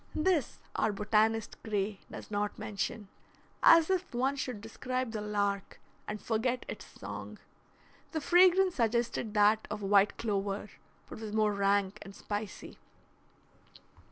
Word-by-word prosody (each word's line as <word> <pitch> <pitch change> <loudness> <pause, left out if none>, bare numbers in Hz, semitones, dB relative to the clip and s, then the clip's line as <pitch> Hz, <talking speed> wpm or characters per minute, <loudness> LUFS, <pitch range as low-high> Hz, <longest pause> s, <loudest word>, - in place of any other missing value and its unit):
This 310 -4 +1 0.2
our 220 - +2
botanist, 215 +2 +1
Gray, 205 -2 -2
does - - -9
not 205 0 -1
mention; 210 -1 -4 0.5
as 330 -1 +7
if 370 -8 -1
one 265 +3 +1
should 255 -5 -4
describe 255 +3 -3
the 215 -2 -4
lark 205 -1 -2 0.3
and 210 0 -4
forget 240 +3 -1
its - - -7
song. - - -7 0.7
The 320 - -1
fragrance 365 +3 +5
suggested 235 -2 0
that 210 +1 +4
of 210 0 -5
white 200 +1 +4
clover, 200 -1 -2 0.4
but - - -9
was 220 -1 -6
more 215 -1 +2
rank 200 0 +1
and 195 0 -10
spicy. 205 -1 -6
215 Hz, 130 wpm, -31 LUFS, 205-250 Hz, 0.7 s, as